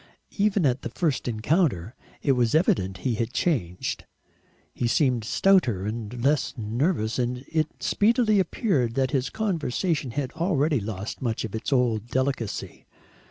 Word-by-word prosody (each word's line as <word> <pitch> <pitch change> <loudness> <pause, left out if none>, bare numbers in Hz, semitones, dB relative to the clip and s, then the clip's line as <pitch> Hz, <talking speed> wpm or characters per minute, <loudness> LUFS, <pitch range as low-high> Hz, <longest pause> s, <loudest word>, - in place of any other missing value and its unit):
Even 200 -4 +3
at 130 -1 +1
the - - -4
first 155 -8 -1
encounter 115 - +1 0.3
it 140 - +3
was 125 -1 +2
evident 95 - +2
he 125 - +2
had 115 +2 -2
changed; 95 - -1 0.7
he 120 - -1
seemed 125 -2 +2
stouter 120 - +3
and 115 +2 -5
less 145 +2 +1
nervous, 115 - 0
and 125 +1 -2
it 155 -1 -2
speedily 215 -1 +3
appeared 160 - 0
that 130 -1 +1
his 135 -3 0
conversation 165 - -1
had 130 +2 -3
already 160 -4 +1
lost 105 -1 -5
much 115 -3 -1
of 110 - -7
its 110 +5 -4
old 120 -4 +1
delicacy. 130 -4 -3
130 Hz, 145 wpm, -25 LUFS, 115-160 Hz, 0.7 s, Even